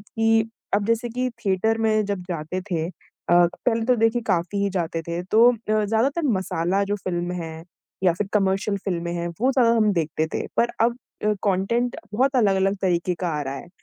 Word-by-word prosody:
कि 225 +1 +1 0.3
अब 205 0 +2
जैसे 230 +1 +1
कि 250 +2 -1 0.2
थिएटर 205 +3 +1
में 215 -1 +2
जब 200 -2 -3
जाते 170 +2 -3
थे 165 -2 0 0.4
अ, 175 - +5 0.3
पहले 230 -2 +2
तो 250 - +4
देखिए 225 +1 +2
काफ़ी 185 -1 -1
ही 200 - +2
जाते 165 -3 -2
थे, 170 +2 -4
तो 220 +6 +5
अ, - - -5 0.3
ज़्यादातर 235 +10 +1
मसाला 185 0 0
जो 205 +1 -1
फ़िल्म 175 -3 -3
हैं 160 0 -8 0.4
या 180 - +5
फिर 205 +4 -2
कमर्शियल 195 0 +1
फ़िल्में 170 -3 -2
हैं, 170 0 -2
वो 255 +3 +3
ज़्यादा 250 -4 +4
हम 215 -2 +3
देखते 160 -2 -1
थे। - - -2
पर 235 - +3
अब 235 +1 +3 0.3
अ, 210 - +3
कॉन्टेंट 210 +5 0 0.2
बहुत 265 +5 +2
अलग-अलग 195 -3 +3
तरीके 180 -1 +1
का 180 - 0
आ - - -1
रहा 135 -1 -4
है, 140 - -9
200 Hz, 195 wpm, -23 LUFS, 175-225 Hz, 0.4 s, अ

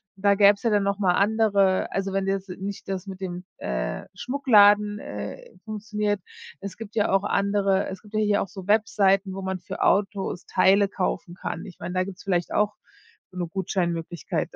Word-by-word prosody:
Da 200 +1 +3
gäb's 200 0 +5
ja 230 - +2
dann 205 -1 +3
noch 200 0 0
mal 190 -3 +2
andere 200 -2 +2
also 195 0 -2
wenn 195 0 0
jetzt 195 0 -2
nicht 195 +2 -6
das 190 -1 -3
mit 190 -1 -8
dem, 180 -1 -5
äh, - - -3
Schmuckladen, 210 -6 +4
äh, - - -7
funktioniert. 210 -1 -2 0.4
Es 200 -1 -7
gibt 220 -1 -10
ja 210 - +2
auch 195 0 +3
andere 200 -1 +1
es 190 - -7
gibt 210 0 -12
ja - - +2
hier 205 -1 +2
auch - - -3
so 190 0 -10
Webseiten, 200 -2 +3
wo 195 - -5
man 190 0 -3
für 175 - -5
Autos 195 -2 0
Teile 195 +2 +4
kaufen 185 -2 -3
kann, 170 - -5
ich 180 - -12
mein, 180 - -6
da 185 0 +1
gibt's 190 0 -9
vielleicht 180 -3 0
auch 210 0 +1 0.6
so 185 - -13
'ne 175 - -1
Gutscheinmöglichkeit 170 -3 -2
dann. - - -11
195 Hz, 195 wpm, -25 LUFS, 190-205 Hz, 0.6 s, gäb's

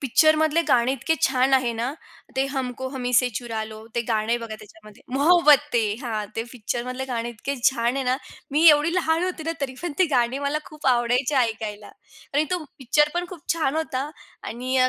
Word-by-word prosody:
पिक्चरमधले 310 +4 +3
गाणे 245 0 +3
इतके 295 +5 0
छान 260 +1 +2
आहे 255 -3 +2
ना, 240 - 0 0.5
ते 265 - +2
"हमको 260 -1 -3
हमी 250 -1 -3
से 250 - +2
चुरा 225 -3 -4
लो" 215 - -9 0.2
ते 235 - +2
गाणं 215 0 0
आहे 240 - +2
बघा 220 -1 -6
त्याच्यामध्ये, 215 0 -16
"मोहब्बतें." 290 -8 +4
हां, 220 -3 -2
ते 225 - -1
पिक्चरमधले 250 +2 -4
गाणे 235 0 -2
इतके 275 +5 -3
छान 240 0 -1
आहे 270 - -1
ना, 255 - +2 0.4
मी 310 +3 +4
एवढी 300 +2 +3
लहान 330 -1 +1
होते 365 -3 -3
ना, - - 0
तरी 260 -1 -7
पण 350 -4 -3
ती 370 - +6
गाणी 245 +1 +2
मला 295 +2 0
खूप 300 -2 -8
आवडायची 245 +4 +1
ऐकायला 215 -2 -5 0.4
आणि 295 - +3
तो 345 - -4
पिक्चर 295 +3 +2
पण 355 - -2
खूप 310 - -17
छान 310 -2 0
होता 290 -3 -2 0.3
आणि 255 +3 -3
अ, 255 0 +4
260 Hz, 195 wpm, -24 LUFS, 235-300 Hz, 0.5 s, ती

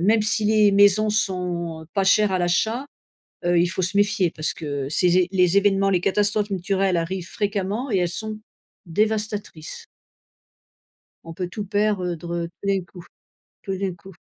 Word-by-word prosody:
même 215 +4 +3
si 215 0 +1
les 210 -1 +4
maisons 205 +2 +5
sont 175 -5 -2
pas 195 - +1
chères 205 +1 +4
à 185 - +1
l'achat, 220 +9 0 0.6
heu, 175 0 +3
il 175 - +3
faut 185 +1 -3
se 185 +3 -2
méfier 200 -4 +2
parce 155 -1 -3
que 145 -4 -4
ces 175 +3 +2
é 180 - +2
les 180 0 +3
évènements, 195 -1 +3
les 180 -2 +2
catastrophes 205 +2 +1
naturelles 190 -1 0
arrivent 170 +1 -3
fréquemment 205 +4 -2
et 195 - +2
elles 175 -1 +1
sont 215 +4 -5 0.5
dévastatrices. 210 -3 -2 1.4
On 165 0 -9
peut 180 0 -4
tout 205 +3 -6
perdre, 205 -1 0
heu, - - -4
tout 170 +2 -10 0.4
d'un 195 -2 +1
coup. 175 0 -13 0.6
Tout 195 -2 -3
d'un 190 -2 -3
coup. 190 +2 -14
195 Hz, 170 wpm, -23 LUFS, 175-210 Hz, 1.4 s, maisons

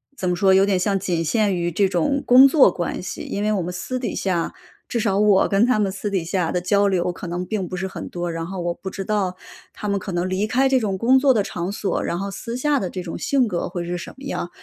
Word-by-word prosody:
怎 185 - -2
么 180 - +1
说？ 190 +1 +4
有 190 - +5
点 195 -2 +2
像 195 +1 0
仅 175 -3 -1
限 210 +1 +1
于 175 0 -1
这 195 +3 +2
种 275 - 0
工 255 +2 +8
作 270 - +5
关 175 -1 -3
系， 185 - -6
因 200 - -4
为 210 +1 +1
我 200 -4 0
们 180 +2 -5
私 190 +8 -4
底 245 - -3
下 175 -4 -1 0.3
至 235 - -2
少 200 -2 +1
我 205 -2 +4
跟 200 +4 +3
他 250 -3 +2
们 200 -2 +1
私 205 +2 -4
底 190 -4 -1
下 175 0 -1
的 180 - -1
交 200 +3 +2
流 180 -2 +1
可 175 0 -8
能 175 +1 -3
并 195 -2 -3
不 185 - -5
是 190 +1 -3
很 - - -7
多。 175 -1 -3
然 165 0 -4
后 190 0 -6
我 175 0 -1
不 190 - -7
知 195 +1 -5
道 195 -3 -1 0.4
他 210 - -6
们 200 0 0
可 190 - -6
能 175 +1 0
离 190 +3 0
开 260 +4 +2
这 265 -1 +3
种 200 -5 -2
工 255 +6 +4
作 270 0 +4
的 210 -4 +1
场 180 +1 -4
所， 205 -1 -2
然 170 - -2
后 195 +2 -4
私 235 +4 -6
下 290 +2 +1
的 185 - -3
这 185 0 -5
种 170 - -6
性 270 -3 +2
格 180 -5 -2
会 175 -1 -4
是 175 +1 -3
什 170 - -8
么 270 - -13
样？ 225 -10 -4
195 Hz, 305 characters per minute, -22 LUFS, 180-215 Hz, 0.4 s, 工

